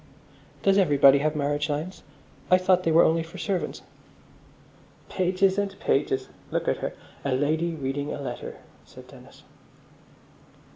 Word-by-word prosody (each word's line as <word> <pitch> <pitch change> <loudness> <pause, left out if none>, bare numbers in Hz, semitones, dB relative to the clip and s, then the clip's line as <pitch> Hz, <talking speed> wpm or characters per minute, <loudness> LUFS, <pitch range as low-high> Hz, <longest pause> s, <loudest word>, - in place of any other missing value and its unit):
"Does 195 0 +4
everybody 140 -6 +5
have 155 +2 0
marriage 145 +1 -1
lines? 155 +6 -4 0.5
I 185 - +6
thought 185 0 +3
they 165 - 0
were 165 +2 +6
only 165 +1 +3
for 165 +3 -10
servants." 190 -3 -3 1.3
"Pages 190 +1 +1
and 200 -1 -3
pages! 400 0 0 0.2
Look - - -2
at - - +1
her! - - -5 0.3
A 140 - 0
Lady 160 +5 0
reading 140 0 -3
a - - -5
Letter," 125 -4 -6 0.3
said - - -15
Dennis. - - -16
165 Hz, 140 wpm, -26 LUFS, 145-185 Hz, 1.3 s, I